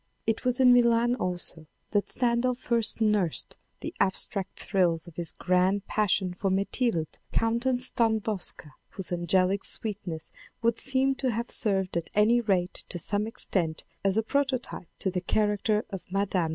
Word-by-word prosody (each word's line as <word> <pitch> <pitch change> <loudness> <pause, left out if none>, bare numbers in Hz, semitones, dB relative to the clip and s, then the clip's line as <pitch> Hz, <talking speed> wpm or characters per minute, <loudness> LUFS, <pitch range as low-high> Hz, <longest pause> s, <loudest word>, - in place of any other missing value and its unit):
It 225 -1 -1
was 250 0 +1
in 250 -1 +7
Milan 235 0 +4
also 175 -7 -4 0.2
than 205 -2 +1
Stendhal 245 0 +1
first 235 -2 +2
nursed 210 -6 +1 0.2
the - - -5
abstract 190 0 -1
thrills 175 -4 0
of 170 -3 -14
his 170 0 -3
grand 185 +2 +1
passion 195 -3 0
for 190 +2 -2
Metilde 195 -2 -1
Countess 245 +3 +1
Dunbowska, 220 -8 -1 0.2
whose 190 -2 -5
angelic 185 +3 +1
sweetness 185 -7 -5 0.3
would 230 0 +1
seem 270 0 +1
to 265 -1 -2
have 235 +1 -3
served 190 -4 +3
at 170 - -4
any 225 +3 +4
rate 190 -4 -1
to - - -4
some 205 +5 -1
extent 170 -7 +3 0.2
as 195 +1 +1
a 220 - +2
prototype 260 -7 -2
to 190 - -2
the 180 0 -2
character 210 +3 0
of 195 -2 -6
Mme. 190 -3 0
205 Hz, 150 wpm, -27 LUFS, 185-235 Hz, 0.3 s, in